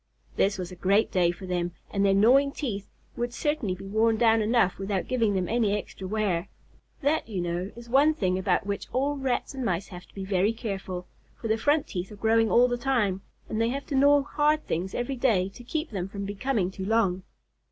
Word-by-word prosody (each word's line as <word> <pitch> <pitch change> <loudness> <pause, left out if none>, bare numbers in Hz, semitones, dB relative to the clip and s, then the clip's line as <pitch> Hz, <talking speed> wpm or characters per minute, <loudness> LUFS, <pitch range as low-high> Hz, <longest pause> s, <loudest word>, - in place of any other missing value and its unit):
This 200 0 +2
was 180 -1 -5
a - - -8
great 200 +5 +2
day 180 -2 +3
for 175 +3 -5
them, 175 -1 -2 0.2
and 200 -1 0
their 195 -1 +4
gnawing 265 +7 +5
teeth 205 -10 -4 0.3
would 240 0 -2
certainly 240 -7 -1
be 190 - -10
worn 220 +3 +2
down 225 -1 +4
enough 215 -4 +2
without 195 -1 -2
giving 230 -5 +1
them 185 -2 0
any 215 -2 +1
extra 190 -2 -7
wear. 200 -4 -1 0.6
That, 290 -3 +1
you 200 -4 -3
know, 175 +3 -2
is 235 0 -11
one 285 +6 +4
thing 185 -7 0
about 190 -1 +1
which 200 0 -3
all 280 +3 +1
Rats 265 -2 -2
and 265 -1 -4
Mice 185 -3 -1
have 180 -1 -10
to - - -25
be 195 -1 -5
very 195 +2 +2
careful, 195 -5 -5 0.3
for 225 - -4
their 220 - +3
front 290 +5 +2
teeth 180 +2 -5
are - - -8
growing 225 +2 +2
all 245 +3 +5
the 245 -1 -2
time, 230 -8 +1 0.3
and 220 - -2
they 230 - +2
have 275 +3 -3
to 285 - -3
gnaw 285 +1 +5
hard 300 +2 +1
things 180 +4 -3
every 250 +2 -2
day 215 -7 +2
to 245 +5 -13
keep 310 +4 -3
them 190 -3 -3
from 200 0 -5
becoming 205 -1 -1
too 190 - -6
long. 200 -4 +2
215 Hz, 220 wpm, -27 LUFS, 190-245 Hz, 0.6 s, gnawing